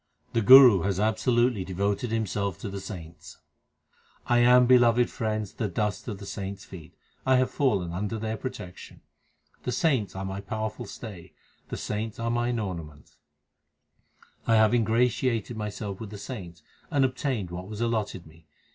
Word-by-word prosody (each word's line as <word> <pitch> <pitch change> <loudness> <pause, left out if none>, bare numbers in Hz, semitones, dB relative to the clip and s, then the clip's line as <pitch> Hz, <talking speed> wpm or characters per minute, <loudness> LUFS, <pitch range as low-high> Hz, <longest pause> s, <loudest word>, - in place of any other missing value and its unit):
The 115 - +2
Guru 125 -4 +9
has 95 +1 -1
absolutely 110 0 +2
devoted 100 +5 -1
himself 100 -4 -2
to - - -4
the 100 0 -6
saints: 90 -4 -9 0.9
1 120 0 +3
am, 125 +1 +6
beloved 120 -1 +4
friends, 110 -3 -3
the 110 - -2
dust 100 +3 -2
of 105 -4 -4
the 100 - -10
saints 100 0 -6
feet; 80 -5 -12 0.3
I 130 0 +3
have 130 0 +2
fallen 100 - 0
under 105 +5 -3
their 110 0 -3
protection. 95 -7 -8 0.6
The 125 - -3
saints 130 - +1
are 95 0 -4
my 95 +1 -4
powerful 110 +3 -4
stay; 100 -6 -9 0.4
the - - -4
saints 105 +1 -4
are 115 0 -1
mine 120 0 0
ornaments. 85 -8 -6 1.3
I 115 - +4
have 110 0 +5
ingratiated 120 0 +1
myself 105 -2 -5
with 110 - -7
the 105 - -8
saints, 90 - -8 0.3
And 140 -2 +3
obtained 130 -7 -2
what 90 +1 -6
was 105 0 -7
allotted 110 -6 -2
me. 80 0 -19
110 Hz, 155 wpm, -27 LUFS, 95-120 Hz, 1.3 s, Guru